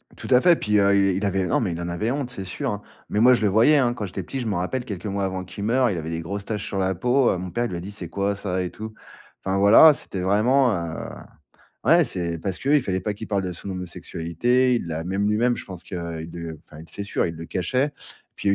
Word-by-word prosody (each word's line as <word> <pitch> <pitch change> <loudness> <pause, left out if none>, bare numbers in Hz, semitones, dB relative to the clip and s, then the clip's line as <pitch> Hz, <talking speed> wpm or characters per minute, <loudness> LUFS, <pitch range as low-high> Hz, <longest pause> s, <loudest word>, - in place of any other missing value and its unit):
Tout - - -9
à 125 -1 +6
fait, 175 -1 +6
puis, 105 -5 +1
heu, 100 0 +4
il 95 -2 +3
il 100 - -1
avait 95 -1 0
non, - - +2
mais 105 -7 -1
il 85 +1 -4
en 85 - -3
avait 105 +7 -1
honte, 135 -3 -2
c'est 95 -6 -5
sûr, 90 - -3
hein. 105 0 -4 0.3
Mais 105 - 0
moi, 125 +3 +7
je 120 - +1
le 105 - +3
voyais, 115 +10 +5
hein, 120 -3 +2
quand 105 -4 -4
j'étais 95 +1 -5
petit, 135 +9 -5
je - - -4
m'en 100 -4 0
rappelle, 120 +8 -2
quelques 100 -3 -6
mois 100 0 -2
avant 95 -1 -3
qu'il 95 +2 -8
meure, 125 +3 +3
il 95 - -2
avait 80 0 -4
des 80 - -3
grosses 100 +4 -5
taches 105 -1 -3
sur 100 - -4
la 95 0 +1
peau, 125 +7 +2
heu, - - -1
mon 90 0 -5
père 120 +8 -1
lui 90 - -5
a - - -4
dit: 95 - -7
«C'est 95 -5 -8
quoi 100 +3 -1
ça?» 95 -2 -2
et 90 - -3
tout. 110 +3 -8 0.5
Enfin, 95 0 0
voilà, 110 +11 +8
c'était 95 -8 -5
vraiment, 120 +7 +3
heu, 85 -2 -4 0.9
ouais 170 +1 +6
c'est 85 -7 -3
parce 95 +1 -3
qu'il 145 +2 +3
fallait 95 -4 -1
pas 105 +3 -2
qu'il 110 +2 -8
parle 100 -2 0
de 90 - -3
son 95 +3 -8
homosexualité, 90 +7 0
il 115 - -2
l'a 80 0 -3
même 100 +3 0
lui-même, 120 +3 +2
je - - -7
pense 90 -3 -9
que, - - -8
heu, 85 -2 -4
il 80 - -8
de 85 -2 -7
enfin 75 - -12
il 80 - -12
c'est 100 - -6
sûr, - - -1
il 85 -1 -5
le 80 - -8
cachait. 130 - 0 0.4
Puis 100 - -2
il - - +5
y - - +5
100 Hz, 290 wpm, -24 LUFS, 90-115 Hz, 0.9 s, voilà